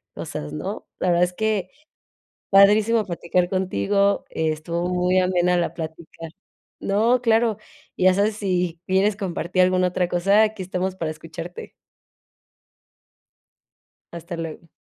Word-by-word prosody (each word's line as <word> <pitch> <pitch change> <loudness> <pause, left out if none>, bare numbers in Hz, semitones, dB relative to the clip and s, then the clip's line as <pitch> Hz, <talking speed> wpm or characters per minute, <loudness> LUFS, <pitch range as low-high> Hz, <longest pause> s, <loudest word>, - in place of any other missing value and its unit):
cosas, 75 0 -6
¿no? 75 - -5
La 185 - 0
verdad 175 0 +3
es 180 - -7
que 210 -2 -1 0.8
padrísimo 210 +3 +5
platicar 175 0 -1
contigo, 190 - +1
estuvo 160 +2 -2
muy 180 +1 +1
amena 180 -1 +2
la 175 - 0
platica 165 0 -8 0.5
No, 230 +5 +2
claro. 225 -2 +2 0.4
Y - - -1
ya 185 0 +6
sabes 205 +3 +1
si 180 -4 -1
quieres 195 +3 +2
compartir 185 -2 -1
alguna 185 0 +3
otra 180 0 -1
cosa, 195 +5 +3
aquí 215 -2 -1
estamos 185 +1 -3
para 165 -4 -3
escucharte. 165 +3 -9 2.4
Hasta 170 0 -7
luego. 165 0 -7
180 Hz, 125 wpm, -23 LUFS, 170-200 Hz, 2.4 s, ya